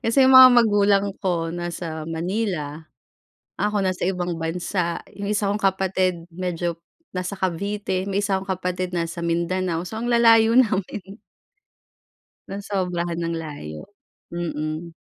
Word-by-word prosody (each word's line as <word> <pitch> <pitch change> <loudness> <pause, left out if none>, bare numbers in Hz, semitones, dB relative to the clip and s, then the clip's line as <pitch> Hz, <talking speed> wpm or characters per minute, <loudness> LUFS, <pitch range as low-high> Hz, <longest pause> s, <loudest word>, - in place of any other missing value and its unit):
Kasi 245 +4 +4
'yung 260 - +5
mga 260 0 +11
magulang 205 -3 +4
ko 170 -4 -1
nasa 170 -2 -5
Manila, 165 -3 -2 0.8
ako 210 +1 0
nasa 185 -2 -1
ibang 180 -2 -2
bansa, 170 +2 -2 0.2
'yung 200 - -4
isa 205 0 0
kong 205 - 0
kapatid 185 -3 0
medyo 175 -1 -3 0.4
nasa 180 +2 -3
Cavite, 190 +1 -2
may 200 0 -1
isa 195 -1 +1
akong 190 0 -3
kapatid 180 0 -2
nasa 170 0 -3
Mindanao 170 +1 -1
so 220 - -6
ang 230 - -3
lalayo 230 -1 +6
namin. 210 -6 +2 1.5
Nasobrahan 180 -4 -3
ng 170 0 -2
layo, 145 - -7 0.5
mm. 165 -1 -4
185 Hz, 125 wpm, -23 LUFS, 170-200 Hz, 1.5 s, mga